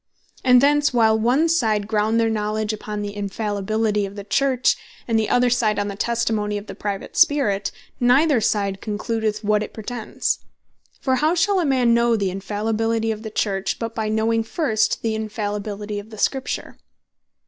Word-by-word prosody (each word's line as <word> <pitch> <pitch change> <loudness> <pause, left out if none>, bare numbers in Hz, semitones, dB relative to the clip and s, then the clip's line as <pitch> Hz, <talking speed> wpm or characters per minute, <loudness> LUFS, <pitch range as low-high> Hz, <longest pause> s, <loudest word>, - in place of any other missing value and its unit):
And 250 -1 +6
thence 290 +1 +3
while 225 -3 +4
one 255 +9 +3
side 220 -11 +1
ground 220 +1 +1
their 230 - +3
Knowledge 215 0 -1
upon 210 0 -5
the 205 0 -5
Infallibility 205 +1 -1
of 195 - -11
the 200 - -6
Church, 255 +5 +2 0.3
and 225 -2 +2
the 215 - -1
other 245 0 +3
side, 225 -4 +2
on 205 0 -1
the 200 - -5
Testimony 220 -2 -1
of 205 - -7
the - - -8
Private 200 -1 -5
Spirit, 210 -9 +3 0.3
neither 255 +2 +4
side 200 -2 0
concludeth 215 0 -2
what 210 0 +2
it 215 - -6
pretends. 225 +1 -3 0.6
For 260 -1 +1
how 310 +5 +2
shall 380 +3 +2
a 345 - +1
man 255 -4 +3
know 235 0 +3
the 200 -4 0
Infallibility 220 +3 -1
of 215 -1 -5
the 220 - -6
Church, 195 -2 -1
but 230 -1 -4
by 220 -1 -2
knowing 225 +1 +1
first 225 -2 0
the 225 -1 0
Infallibility 210 -1 -4
of 205 +2 -11
the 215 - -11
Scripture? 265 +5 -2
220 Hz, 175 wpm, -22 LUFS, 210-240 Hz, 0.6 s, And